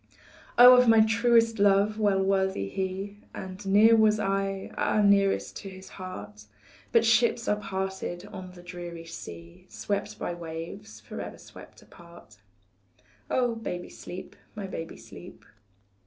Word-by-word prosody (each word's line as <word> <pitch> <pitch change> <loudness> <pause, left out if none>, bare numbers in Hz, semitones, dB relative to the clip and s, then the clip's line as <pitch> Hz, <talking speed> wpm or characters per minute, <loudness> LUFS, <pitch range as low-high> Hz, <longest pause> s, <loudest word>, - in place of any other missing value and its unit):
Oh, 250 +1 +10
of 250 0 +5
my 225 -1 +7
truest 230 0 +3
love 200 +2 +3
well 200 -2 +2
worthy 190 - 0
he, 190 - -4 0.2
And 190 +2 -8
near 215 +4 +6
was 215 -1 +4
I, 195 -1 -2
ah, - - +1
nearest 200 -1 +2
to 195 - -8
his 190 0 -12
heart; 105 - -9 0.5
But 230 -1 +4
ships 230 +1 +3
are 210 - +2
parted 190 -3 -4
on 185 -1 -8
the 175 -1 -14
dreary 175 -1 -8
sea 85 - -10
Swept - - -4
by - - -3
the 175 - -10
waves, 160 -10 -8
forever 105 - -7
swept - - -14
apart 170 0 -16 0.9
Oh, 245 -2 +1
baby, 180 -6 -5
sleep, 185 +1 -9 0.2
my 205 -2 -5
baby, 165 -4 -7
sleep. - - -13
195 Hz, 140 wpm, -27 LUFS, 175-215 Hz, 0.9 s, Oh